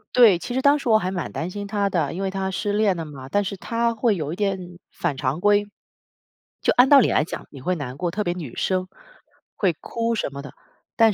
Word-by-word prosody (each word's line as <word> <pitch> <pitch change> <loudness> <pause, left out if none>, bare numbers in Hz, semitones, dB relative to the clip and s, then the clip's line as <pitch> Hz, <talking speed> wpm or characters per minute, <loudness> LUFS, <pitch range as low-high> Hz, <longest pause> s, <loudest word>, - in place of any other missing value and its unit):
对， 230 -7 +7
其 245 - -6
实 260 - 0
当 285 +2 +5
时 275 - -3
我 220 - +6
还 185 - -2
蛮 185 -2 -4
担 165 - -3
心 205 +2 -6
她 200 -1 0
的， 165 -7 0
因 185 - -4
为 195 - 0
她 190 0 -2
失 205 +2 -2
恋 205 -3 +2
了 165 - -4
嘛， 135 -3 -10
但 205 +6 +1
是 200 - -3
她 230 +4 -1
会 225 0 +2
有 155 -1 -3
一 - - -4
点 185 -3 -3
反 170 -5 -2
常 135 +3 -2
规， 205 +2 +3 1.0
就 - - +3
按 250 +2 +6
道 285 - +9
理 245 - +4
来 - - +3
讲 160 - -7
你 140 - -11
会 180 +7 0
难 135 -6 -5
过， 175 +1 -2
特 205 +5 -2
别 175 - -1
女 160 -9 -7
生 185 -1 0 0.7
会 190 -5 +1
哭 230 0 -2
什 220 - -1
么 140 - -6
的， 140 - -10 0.4
但 225 -2 +5
190 Hz, 265 characters per minute, -23 LUFS, 170-215 Hz, 1.0 s, 道